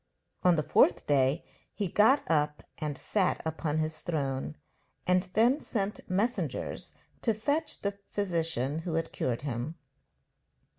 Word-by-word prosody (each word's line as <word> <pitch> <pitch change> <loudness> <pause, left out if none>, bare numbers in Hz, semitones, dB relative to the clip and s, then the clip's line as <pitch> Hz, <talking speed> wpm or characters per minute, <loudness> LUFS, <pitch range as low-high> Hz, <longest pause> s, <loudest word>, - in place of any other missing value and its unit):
On 180 -1 +5
the 155 - +1
fourth - - +4
day 140 +2 +2 0.3
he 205 - -1
got 220 +10 +5
up 150 -2 +1 0.2
and 150 -2 -2
sat 190 +3 +1
upon 160 -1 -1
his 155 0 -1
throne, 135 - -2 0.5
and 180 +1 +2
then 245 +7 +4
sent 205 -5 -3
messengers 210 +7 -1 0.3
to 225 -3 +1
fetch 290 +8 -1
the 200 0 -2
physician 165 -7 -1
who 165 -1 -3
had 165 0 -1
cured 125 +1 -2
him. 135 +3 -3
165 Hz, 135 wpm, -30 LUFS, 150-200 Hz, 0.5 s, On